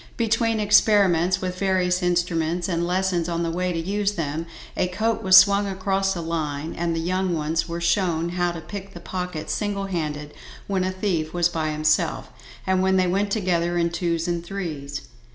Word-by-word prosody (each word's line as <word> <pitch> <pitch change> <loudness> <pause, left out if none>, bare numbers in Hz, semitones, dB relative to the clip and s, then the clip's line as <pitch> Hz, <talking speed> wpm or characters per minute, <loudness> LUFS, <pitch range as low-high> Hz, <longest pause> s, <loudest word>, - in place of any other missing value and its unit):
Between 225 -1 +1
experiments 195 -4 +4
with 185 -1 -4
various 185 -1 +1
instruments, 175 -1 0
and 170 -2 -1
lessons 180 -2 0
on 170 0 -1
the 165 - -1
way 180 +2 -1
to 170 - -3
use 200 +4 -1
them, 160 -1 -3 0.3
a 185 - +1
coat 220 +4 -1
was 190 -3 +7
swung 200 +1 +6
across 195 0 0
a 170 - -3
line, 160 -2 -3
and 170 -1 -1
the - - -1
young 185 +1 0
ones 160 +2 -1
were 170 0 -3
shown 170 -1 +1
how 175 0 0
to 170 -1 -7
pick 195 +4 -8
the - - -7
pocket 180 -4 -5
single 205 -2 -2
handed 150 -5 -4 0.3
when 190 -2 0
a 185 - 0
thief 180 -5 -2
was 175 0 +3
by 160 -2 -2
himself, 155 0 0 0.4
and 190 -1 +2
when 190 0 +3
they 185 - +3
went 195 +3 0
together 175 -4 0
in 170 0 +1
twos 170 -1 -1
and 170 -1 -1
threes. 155 -7 -5
180 Hz, 190 wpm, -24 LUFS, 165-190 Hz, 0.4 s, was